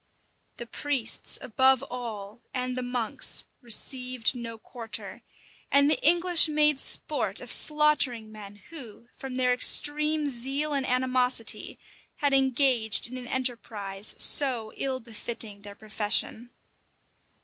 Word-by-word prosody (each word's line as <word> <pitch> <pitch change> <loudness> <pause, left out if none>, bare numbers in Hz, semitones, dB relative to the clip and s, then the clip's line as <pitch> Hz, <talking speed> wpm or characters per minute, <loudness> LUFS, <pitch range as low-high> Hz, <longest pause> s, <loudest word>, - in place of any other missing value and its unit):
The 235 - -7
priests, 265 -1 -1
above 260 +2 +2
all, 225 -3 -8
and 255 0 -3
the 255 - -3
monks, 245 -3 0 0.2
received 250 0 +1
no 230 -2 -7
quarter; 225 0 -8 0.5
and 280 +1 +4
the - - 0
English 345 +1 +4
made 300 -2 +2
sport - - -1
of - - -6
slaughtering 295 -7 +2
men 205 -2 -11 0.2
who, 240 -6 -11
from 265 -1 -8
their 250 -1 +1
extreme 300 +4 +1
zeal 275 +4 -2
and 275 -2 -2
animosity, 255 -2 -1 0.4
had 285 -2 0
engaged 260 -4 +3
in 250 - -7
an 250 -1 -7
enterprise 220 -6 -2
so 245 -6 +3
ill 265 -1 -2
befitting 225 -2 -2
their 205 0 -11
profession. 215 +2 -1
250 Hz, 120 wpm, -26 LUFS, 225-275 Hz, 0.5 s, and